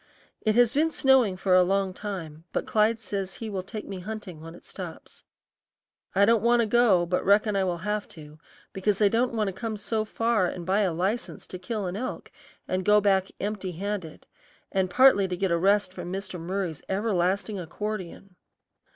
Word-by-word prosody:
It 215 -1 +1
has 240 0 +4
been 310 +3 +3
snowing 265 -10 +3
for 185 0 +1
a 185 - +7
long 190 +1 +1
time, 175 -6 -6
but - - -1
Clyde 220 +1 +2
says 195 -3 -4
he 225 -2 -6
will 190 -2 -2
take 210 +3 -8
me 195 -2 -6
hunting 190 -4 -7
when 165 +1 -10
it - - -15
stops. - - -9 0.9
I 200 +1 +6
don't 230 0 +4
want 235 +1 +4
to - - +2
go 215 -6 +4
but 180 +1 -1
reckon 205 +1 +3
I 195 - +2
will 175 -2 -1
have 210 +4 -3
to, 150 0 -12 0.3
because 195 +1 0
I 205 -2 +5
don't 240 +3 +1
want 215 -3 +1
to - - -6
come 220 +3 -4
so 210 +2 -1
far 220 -3 +1
and 175 -1 -6
buy 195 +3 +2
a 195 -4 +2
license 195 +9 -2
to 185 - -8
kill 205 +2 -3
an 180 0 -3
elk 245 +5 -5 0.4
and 185 0 -1
go 210 +2 +5
back 195 -2 +2
empty 200 -3 -3
handed, 185 -2 -5 0.5
and 190 -1 +1
partly 245 -2 +5
to 180 -1 -3
get 190 -1 0
a 170 - +3
rest 200 +1 +2
from 180 -1 -6
Mr. 190 -1 -5
Murry's 175 -2 -3
everlasting 195 0 0
accordion. 195 +1 -6
195 Hz, 195 wpm, -26 LUFS, 185-215 Hz, 0.9 s, a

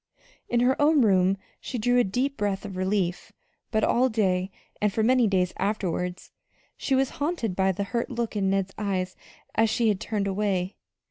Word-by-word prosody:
In 240 - +2
her 260 +3 +2
own 295 -2 +5
room 190 -2 +3 0.2
she 255 - -5
drew 245 +2 +3
a - - +5
deep 255 +8 -1
breath 205 -3 -2
of 195 -2 -6
relief; 185 -1 -1 0.4
but 220 -2 0
all 255 +2 +3
day, 190 -5 +1 0.3
and 210 -1 +2
for 220 +2 0
many 250 0 +4
days 185 -2 +1
afterward, 180 -3 -1 0.6
she 270 - 0
was 265 0 +2
haunted 285 - -1
by 190 0 +2
the 195 +2 -2
hurt 235 +4 -2
look 235 -3 -3
in 195 -2 +1
Ned's 195 0 0
eyes 185 -3 -2 0.4
as 225 0 +3
she 230 0 +2
had 200 -3 +1
turned 210 -2 -2
away. 195 -2 -1
205 Hz, 185 wpm, -26 LUFS, 190-240 Hz, 0.6 s, own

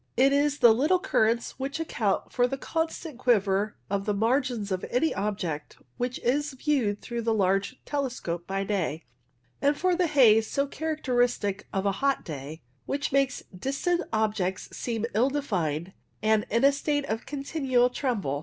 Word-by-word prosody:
It 270 +2 +5
is 290 0 +2
the 240 -4 +7
little 300 +11 +3
currents 235 - 0
which 275 +3 -3
account 225 -11 -1
for 250 - -2
126 - - +2
WAVE 270 - -2
CLOUDS 320 +3 -2
the - - -13
constant 295 -7 -8
quiver 205 -4 +2
of 200 0 -2
the 210 - +1
margins 230 -1 0
of 185 -1 -1
any 285 +7 +1
object 190 -7 -3 0.2
which 245 +1 -2
is 285 +4 +1
viewed 255 -7 0
through 235 -1 -4
a 230 - -1
large 195 +3 +1
telescope 245 - -3
by 195 0 -1
day, 180 -6 -2 0.6
and 285 +1 +3
for 365 0 +2
the 360 0 +2
haze, 225 -7 +5
so 280 - +1
characteristic 245 -9 -1
of 195 -1 -1
a 200 - +3
hot 275 0 +1
day, 150 +1 -7 0.2
which 280 +1 -2
makes 275 -1 +1
distant 275 - 0
objects 210 -4 -1
seem 230 -2 -2
ill 235 +6 +3
defined 185 - -2 0.3
and 215 -1 +2
in 230 +4 +1
a 280 - +7
state 290 0 -1
of 225 -3 -4
continual 270 -3 +1
tremble. 210 - -1
240 Hz, 175 wpm, -27 LUFS, 200-280 Hz, 0.6 s, the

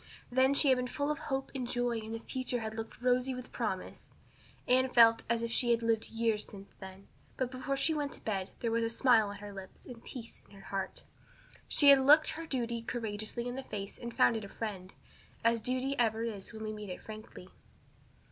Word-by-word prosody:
Then 260 +2 +4
she 280 - +4
had 260 - +5
been 250 0 -1
full 285 +3 -1
of 300 - -3
hope 270 -1 -3
and 255 -3 -3
joy 245 -2 0
and 220 +1 -6
the 225 - -6
future 255 -1 -2
had 220 0 -4
looked 225 +2 -7
rosy 250 +1 +2
with 250 0 -8
promise. - - -4 0.6
Anne 260 +1 +4
felt 230 -2 +6
as 235 0 +1
if 230 - -2
she 240 +1 +2
had 235 0 +3
lived 225 -1 +1
years 225 -2 +1
since 200 -1 -11
then, 190 0 -10 0.3
but 255 -1 -1
before 265 +2 -2
she 320 - +2
went 290 -2 -2
to - - -6
bed 195 -3 -2
there 230 - 0
was 230 0 +1
a 230 - 0
smile 230 -3 +4
on 200 - -6
her 205 0 -9
lips 195 -1 -10
and 235 -2 -10
peace 235 -3 -9
in - - -17
her 195 -1 -13
heart. 195 -1 -3 0.6
She 285 - +6
had 275 -1 +8
looked 300 +4 +7
her 325 +1 -5
duty 235 -4 -2
courageously 225 0 -3
in 245 - -3
the 265 - -4
face 200 -6 -6
and 235 -1 -5
found 230 - +4
it 220 - -3
a 200 - -8
friend 195 -5 -5 0.5
as 230 0 +3
duty 255 +4 0
ever 225 -1 +2
is 210 -4 -5
when 220 -1 -7
we 215 0 -3
meet 210 -2 -7
it 180 - -6
frankly. 215 -4 -10
230 Hz, 225 wpm, -32 LUFS, 215-255 Hz, 0.6 s, had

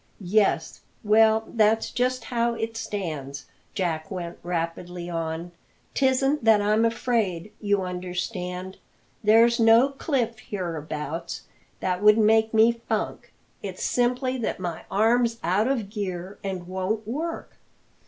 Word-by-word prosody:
"Yes? 200 -6 +2 0.2
Well, 220 +1 +5
that's 220 0 +2
just 255 +1 0
how 235 -1 0
it 225 0 -4
stands," 155 -11 -5 0.3
Jack 165 -4 -2
went 175 -3 -6
rapidly 175 +1 -4
on. 165 +1 -3 0.4
"Tisn't 270 +1 +2
that 220 -2 +6
I'm 215 +2 +2
afraid, 220 -5 -1
you 205 -2 +1
understand 180 +1 -4 0.5
there's 230 +3 +5
no 230 +4 +6
cliff 255 -5 -2
hereabouts 165 -4 -5 0.4
that 180 0 -1
would 210 +1 +6
make 220 0 +4
me 225 +1 +5 0.2
funk - - -2 0.3
it's - - -6
simply 250 +1 0
that 225 - -2
my 175 -3 -5
arm's 230 +3 +2
out 190 +7 +2
of 230 -7 -1
gear 190 -3 -5
and 185 -3 -4
won't 190 +4 -2
work. 320 +8 -4
210 Hz, 125 wpm, -25 LUFS, 180-230 Hz, 0.5 s, that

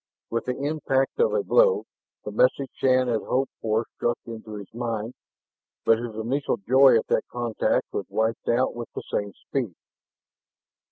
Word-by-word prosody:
With 115 - -1
the 125 - -2
impact 140 -2 0
of 470 - +4
a - - +1
blow, 475 -4 +4 0.4
the - - -4
message - - +2
Shann 130 -1 +3
had 115 -3 +1
hoped 135 +1 0
for 110 +1 +1
struck 120 0 0
into 110 -2 -8
his 100 -1 -9
mind. 115 -1 -3 0.7
But 115 0 +5
his 120 -2 -5
initial 120 +5 -1
joy 130 +4 +6
at 110 - -1
that - - +1
contact 120 -2 0
was - - -3
wiped 110 +1 -1
out 120 +2 +2
with 120 -1 -6
the - - -4
same 100 -1 -1
speed. 120 -11 -4
120 Hz, 165 wpm, -25 LUFS, 110-135 Hz, 0.7 s, joy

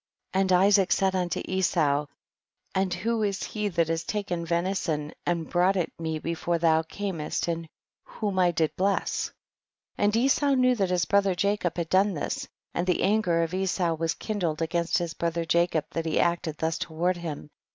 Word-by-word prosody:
9. 190 - +3
And 190 -1 +1
Isaac 195 +1 +4
said 190 -1 +3
unto 180 -2 -1
Esau, 155 -6 +1 0.7
and 190 -1 +1
who 225 +6 -1
was 200 -2 -1
he 210 -1 -2
that 170 -4 +1
has 165 0 -1
taken 195 -5 -3
venison 170 -3 -1 0.2
and 170 -2 0
brought 180 +2 +2
it 180 -3 -1
me 160 -1 -2
before 170 +2 -1
thou 160 -1 +3 0.2
earnest 185 -8 -2
and 165 -1 -2 0.4
whom 200 -4 -3
I 180 -1 +5
did 160 -2 0
bless? 195 +1 0 0.7
And 205 +1 +3
Esau 275 +3 +3
knew 255 -1 +4
that 195 -6 0
his 180 -1 +1
brother 200 -2 +2
Jacob 200 -2 0
had 170 -2 -2
done 195 +1 +3
this, 145 - -3 0.3
and 175 +2 -1
the 180 - +1
anger 185 -5 +2
of 165 +1 -3
Esau 185 -2 0
was 165 0 -1
kindled 180 -8 -2
against 170 +1 0
his 170 -2 -2
brother 170 0 -2
Jacob 170 -2 +2
that 165 0 -3
he 160 - -1
had 170 - +4
acted 160 -3 -6
thus 160 0 -1
toward 175 +3 -1
him. 155 -3 -6
175 Hz, 185 wpm, -27 LUFS, 165-195 Hz, 0.7 s, I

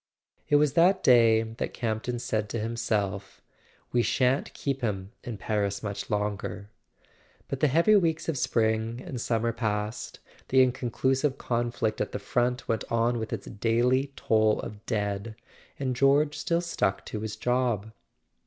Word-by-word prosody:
It 145 - +4
was 145 -1 +4
that 180 +4 +4
day 115 -3 +6
that 115 0 -5
Campton 115 +1 -2
said 110 -3 -2
to 115 - -3
himself: 105 -4 -2 0.5
"We 120 - +3
shan't 130 +3 +1
keep 135 -2 -2
him 100 -4 -2
in 120 -3 -5
Paris 100 -1 -1
much 100 -1 -4
longer." 105 0 -3 0.8
But 135 - -4
the 150 - +4
heavy 165 +10 +4
weeks 165 -5 +1
of 165 - 0
spring 115 -2 0
and 135 -9 -5
summer 115 0 0
passed, 110 -1 -3 0.3
the 130 0 +5
inconclusive 130 +2 0
conflict 120 -2 -1
at - - -2
the - - -1
front 125 0 -1
went 110 -2 0
on 115 +1 +1
with 110 0 -5
its - - -4
daily 120 +6 +1
toll 110 -1 +2
of 105 0 -8
dead, 105 -1 -2 0.4
and 130 -2 -2
George 140 +3 +3
still 170 +3 0
stuck 95 - -1
to 105 - -5
his 110 -1 -4
job. 120 -4 0
115 Hz, 155 wpm, -27 LUFS, 110-130 Hz, 0.8 s, day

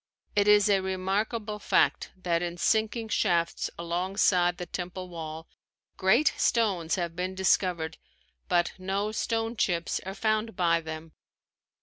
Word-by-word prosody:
It 205 0 +3
is 210 -1 +6
a 200 -2 +4
remarkable 205 +3 -2
fact - - +2
that 170 -1 +1
in 175 0 -3
sinking 220 +4 +1
shafts 170 -5 +1
alongside 175 +1 +1
the 180 - -5
temple 180 +1 -6
wall, 160 -1 -7 0.5
great 225 +10 +3
stones 190 -8 +1
have 170 -2 -3
been 185 +1 -3
discovered 180 -3 +1 0.5
but 175 -1 +2
no 195 +3 -1
stone 225 +1 -1
chips 175 -6 0
are 190 +1 -6
found 215 0 0
by 170 -2 +2
them. 160 0 -7
185 Hz, 130 wpm, -28 LUFS, 170-210 Hz, 0.5 s, is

